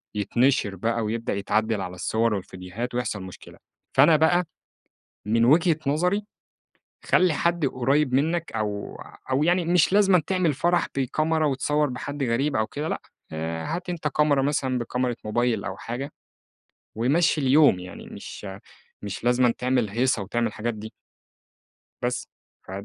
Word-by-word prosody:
يتنشر 120 0 +1
بقى 115 +5 -1
ويبدأ 115 +2 -2
يتعدل 110 +1 0
على 90 -1 -5
الصور 110 +2 0
والڤيديوهات 95 +7 -6
ويحصل 110 -5 -2
مشكلة، 95 - -12 0.4
فأنا 165 - +7
بقى 175 +3 +3 0.8
من 115 +2 +3
وجهة 160 +5 +4
نظري 180 +8 +1 0.8
خلِّ 185 -1 +4
حد 170 +1 +1
قريب 135 +2 +1
منّك 160 +5 +1
أو 105 -2 -4 0.3
أو 135 +3 +2
يعني 175 +2 +2
مش 175 +1 +3
لازم 195 -2 +5
تعمل 180 -1 0
فرح 175 +5 +1
بكاميرا 155 +4 +1
وتصور 145 +2 0
بحد 140 +3 -5
غريب 130 +4 0
أو 110 -2 +1
كده 150 +2 -4
لأ، - - -3 0.3
آآ 80 +1 -4
هات 180 +3 -4
أنت 170 -3 -2
كاميرا 150 -1 +2
مثلًا 135 -2 0
بكاميرا 125 +1 -1
موبايل 115 0 0
أو 95 0 -5
حاجة، 125 +5 -5 0.8
ومشّي 150 +8 +2
اليوم 140 -5 +5
يعني 90 0 -9
مش - - -9 0.6
مش 100 +1 -6
لازمًا 125 0 +3
تعمل 125 -3 +1
هيصة 120 +2 +1
وتعمل 115 +4 -1
الحاجات 110 +2 -3
دي. 110 +1 -8 1.1
بس 125 +1 -2 0.4
ف - - -12
130 Hz, 140 wpm, -25 LUFS, 110-155 Hz, 1.1 s, فأنا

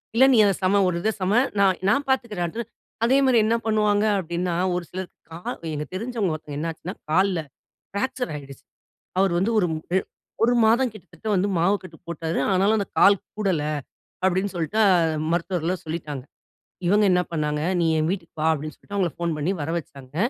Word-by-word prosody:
இல்ல 260 +3 +7
நீ - - +5
அத 200 - +3
சம, 200 +2 +4
ஒரு 180 - 0
இத 220 - +1
சம, 185 +2 +1 0.3
நான் 190 -2 +3
நான் 280 +7 +2
பார்த்துக்கிறேன். 215 -10 0 0.5
அதே 260 +3 +4
மாதிரி 255 -3 +4
என்ன 225 - +2
பண்ணுவாங்க 210 -1 +2
அப்படின்னா, 175 0 -2 0.2
ஒரு 180 - -2
சிலர் 185 -1 -5 0.2
கால் 170 +2 -6
எங்க 150 0 -3
தெரிஞ்சவங்க 220 -3 -1
ஒருத்தவங்க 150 -2 -7
என்னாச்சுன்னா, 165 +3 -4 0.2
கால்ல 185 +2 +2 0.5
ஃப்ராக்சர் 250 +5 -2
ஆயிடுச்சு. 140 -2 -9 0.5
அவரு 190 -2 +3
வந்து, 195 +6 +1
ஒரு 180 - +3 0.3
அ - - +5 0.5
ஒரு 245 - +3
மாதம் 240 +3 +3
கிட்டத்தட்ட 215 +1 -10
வந்து, 195 +3 +1
மாவு 185 +5 +3
கட்டு 170 -3 -11
போட்டாரு. 165 0 -2
ஆனாலும் 195 +4 +3
அந்த 200 - -1
கால் 200 -1 +6 0.2
கூடல 190 -8 +1 0.6
அப்டின்னு 190 +2 +1
சொல்ட்டு, 175 +7 -1 0.5
மருத்துவர்கள்லாம் 175 0 -1
சொல்லிட்டாங்க. 150 -5 -5 0.6
இவங்க 205 +3 +4
என்ன 180 0 +3
பண்ணாங்க, 150 -2 -1 0.2
"நீ 170 - +2
என் 155 +1 +1
வீட்டுக்கு 180 -4 -5
வா" 155 - +1
அப்டின்னு 155 0 -4
சொல்ட்டு 205 - -8
அவங்களை 180 -6 +1
ஃபோன் 170 -2 -1
பண்ணி 155 +6 0
வர 155 - -3
வச்சாங்க. 140 -3 -11
185 Hz, 170 wpm, -24 LUFS, 165-205 Hz, 0.6 s, இல்ல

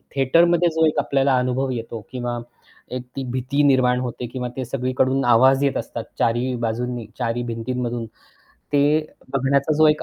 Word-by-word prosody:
थेटरमध्ये 170 +6 +4
जो 160 0 +4
एक 155 - 0
आपल्याला 135 -1 +2
अनुभव 130 +2 0
येतो 115 -1 -5
किंवा 120 -1 -3 0.6
एक 125 - -4
ती 135 - -3
भीती 130 +3 0
निर्माण 130 -3 +4
होते 125 -1 -4
किंवा 125 +1 -4
ते 130 - -2
सगळीकडून 130 +2 0
आवाज 130 +3 +5
येत 140 - +1
असतात - - -5 0.2
4 115 - +3
ही 125 +1 -1
बाजूंनी, 120 +1 -3
4 115 -2 -1
ही 120 - -2
भिंतींमधून, 120 0 -3 0.7
ते 145 -1 +4 0.5
बघण्याचा 140 +2 +2
जो 155 - +7
एक 150 0 +2
130 Hz, 170 wpm, -22 LUFS, 120-135 Hz, 0.7 s, जो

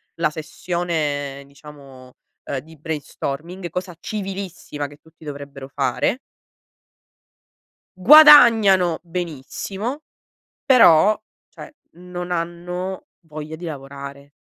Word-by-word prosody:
la 165 -2 +1
sessione, 155 -3 -3
ehm, 140 - -17
diciamo, 140 -3 -15 0.3
uhm, 135 - -3
di 160 +4 -16
brainstorming, 160 +3 -5
cosa 180 0 -5
civilissima 190 -8 -5
che 145 +1 -15
tutti 160 0 -19
dovrebbero 140 -2 -8
fare. 140 - -1 1.8
Guadagnano 225 - +7
benissimo, 180 - -5 0.6
però, 215 - +6 0.3
cioè, - - -12 0.2
non 180 0 -7
hanno 180 +2 -4 0.2
voglia 155 0 -7
di 165 +3 -9
lavorare, 140 -1 -9
165 Hz, 90 wpm, -21 LUFS, 145-180 Hz, 1.8 s, Guadagnano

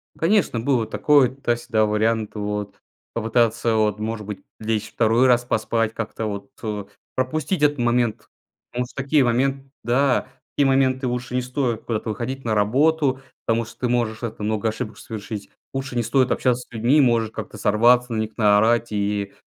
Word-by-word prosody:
Конечно, 175 - +2
было 120 -2 +1
такой- 130 +1 +3
туда-сюда 120 -4 0
вариант, 110 +1 0
вот. 105 -1 -4 0.3
Попытаться 115 0 +1
вот, 105 -1 +1
может 110 0 -4
быть, 100 -2 -7 0.2
лечь 110 -1 -2
2 115 +3 +3
раз 120 -1 +4
поспать. 115 -1 0
Как-то 115 0 -4
вот, 100 +2 -5
э, 105 -2 -3 0.3
пропустить 150 +6 -1
этот 145 0 +3
момент. 120 -2 0 0.4
Потому 125 +1 -2
что 120 - -15
в 140 - -4
такие 140 +1 +3
момент 135 +3 +1 0.2
да, 125 +3 +2 0.3
в - - -
такие 145 - +3
моменты 130 -1 +2
лучше 125 0 -3
не 125 - +2
стоит 125 -3 -2
куда-то 110 -1 -3
выходить 120 +5 -4
на 110 - +1
работу. 135 +6 +2 0.2
Потому 115 0 +1
что 115 - -14
ты 125 - +1
можешь, 120 -2 -1
это, 110 -2 -5
много 110 +1 0
ошибок 110 0 -5
совершить. 105 -1 -7 0.2
Лучше 135 -1 -4
не 120 - +1
стоит 130 +2 +2
общаться 125 -1 +1
с - - -22
людьми. 120 +7 +3
Можешь 115 -4 +2
как-то 110 - -7
сорваться 120 +4 +3
на - - -1
них, 110 0 -6
наорать. 110 +2 +3
И, 100 -1 -1
115 Hz, 175 wpm, -22 LUFS, 110-130 Hz, 0.4 s, раз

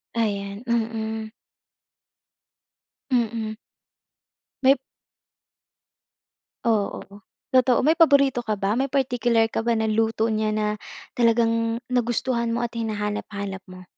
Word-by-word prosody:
Ayan, 200 -2 -2
mm. 220 -1 -2 1.8
Mm. 225 -3 0 1.1
May 265 +1 +7 1.9
Oo, 220 -4 0 0.5
totoo. 255 -1 +4
May 300 - +5
paborito 280 -5 +5
ka 220 -3 -2
ba? 195 0 -1
May 270 - +1
particular 240 -4 +1
ka - - -1
ba 235 - +3
na 220 - 0
luto 220 +1 +1
niya 215 0 0
na 215 0 0 0.4
talagang 230 0 +1
nagustuhan 240 -1 0
mo 240 - -1
at 235 - -2
hinahanap-hanap 210 -3 -3
mo? 185 0 -11
225 Hz, 105 wpm, -24 LUFS, 215-240 Hz, 1.9 s, May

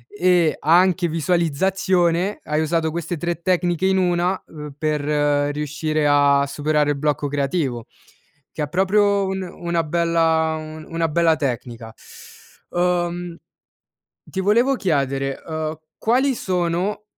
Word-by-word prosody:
e 180 -4 +3
anche 175 +2 +3
visualizzazione; 175 +3 +1
hai 155 +1 -1
usato 160 0 0
queste 170 +1 -4
3 170 +1 -3
tecniche 180 0 +1
in 190 - +2
1, 180 0 +1
uhm, 150 -2 -10
per 155 -1 -1 0.5
riuscire 150 +1 -2
a 140 -1 +4
superare 150 +1 0
il 145 - -2
blocco 150 0 -1
creativo, 140 -4 -2 0.6
che 155 - -6
è 145 - -4
proprio 200 +3 +2
un 190 0 -3
una 170 -1 -3
bella 165 -1 +1
un 155 0 -9
una 165 0 -1
bella 165 0 +3
tecnica. 120 -5 -4 0.8
Uhm, 175 -1 -1 0.9
ti 190 - -6
volevo 235 +8 +3
chiedere, 135 - -1
uhm, 155 -1 -4 0.2
quali 260 +4 +2
sono 180 +2 -1
165 Hz, 120 wpm, -21 LUFS, 150-180 Hz, 0.9 s, a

